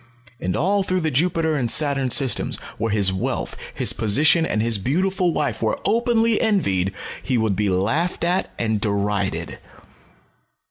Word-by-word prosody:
And 90 - -2
all 195 +6 +1
through 185 -1 -1
the 160 -1 -1
Jupiter 160 +2 +1
and 125 -5 0
Saturn 140 -1 +2
systems, 130 0 +3 0.2
where 115 0 -1
his 100 -3 +2
wealth, 95 - -3 0.2
his - - 0
position, 150 +10 +3
and 105 - -1
his 115 -1 +1
beautiful 180 - 0
wife 150 - -2
were 110 -1 0
openly 230 -1 +2
envied, 100 - +1 0.3
he 130 -2 -1
would 110 -3 0
be 105 0 0
laughed 115 - -1
at 175 +2 0
and 110 -3 -1
derided. 100 -2 -2
135 Hz, 150 wpm, -21 LUFS, -, 0.3 s, systems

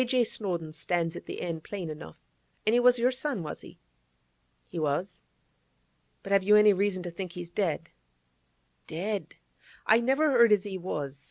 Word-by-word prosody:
J. 250 0 +2
Snowdon" 175 -8 -3
stands 165 +1 -1
at - - -9
the - - -6
end, 165 -2 -4
plain 195 -4 -5
enough. 115 - -10 0.5
And 215 - +3
he 240 - +5
was 250 0 +5
your 245 +2 +2
son, 260 - -2
was 150 - -6
he?' - - -14 0.9
'He - - -6
was. 155 +5 -2 1.0
But 195 - -7
have 200 -1 +5
you 210 +2 +5
any 210 -1 +7
reason 190 -1 0
to 175 - -5
think 180 0 -6
he's 175 -1 -7
dead?' 175 -5 -1 1.0
'Dead! 195 +6 -4 0.5
I 220 +1 +5
never 270 +5 +2
heard 235 -3 +6
as 205 -2 +4
he 200 -2 -6
was. 145 -7 -4
195 Hz, 175 wpm, -28 LUFS, 170-225 Hz, 1.0 s, any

